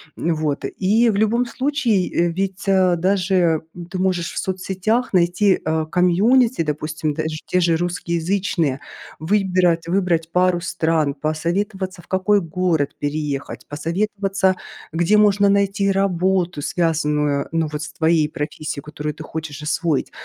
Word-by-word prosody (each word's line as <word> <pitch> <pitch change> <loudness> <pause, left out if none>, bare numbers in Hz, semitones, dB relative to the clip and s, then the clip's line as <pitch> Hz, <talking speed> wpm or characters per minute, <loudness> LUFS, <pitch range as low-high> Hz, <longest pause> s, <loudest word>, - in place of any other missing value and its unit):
Вот 155 -3 -1
и 220 +5 +2
в 215 - 0
любом 225 +4 +2
случае, 250 -7 0
э, 170 0 +2
ведь, 190 +2 -3
а, 185 -2 +4
даже, 180 -2 +2
м, 175 -1 -8
ты 185 - -5
можешь 180 -2 0
в - - -9
соцсетях 190 +6 -1
найти, 180 +2 +3
э, 160 0 0
комьюнити, 210 +7 +3
допустим, 155 0 -2
даже 155 +1 -3
те 180 - +1
же 170 -2 +3
русскоязычные, 170 -2 -1 0.4
выбирать 180 -2 +1
выбрать 170 -3 0
пару 180 0 +2
стран, 160 -3 0
посоветоваться 185 +4 -2
в - - -23
какой 190 +2 +2
город 165 -4 0
переехать, 145 -1 -3
посоветоваться 195 +4 0 0.4
где 175 +6 +3
можно 205 -1 +4
найти 200 0 +2
работу, 185 -3 0
связанную 150 -4 0
ну 165 -1 0
вот 150 0 -4
с 160 - -6
твоей 160 -2 +2
профессией, 150 -1 -5
которую 150 0 -5
ты - - -8
хочешь 155 -2 -6
освоить. 160 -1 -1
175 Hz, 135 wpm, -21 LUFS, 160-195 Hz, 0.4 s, а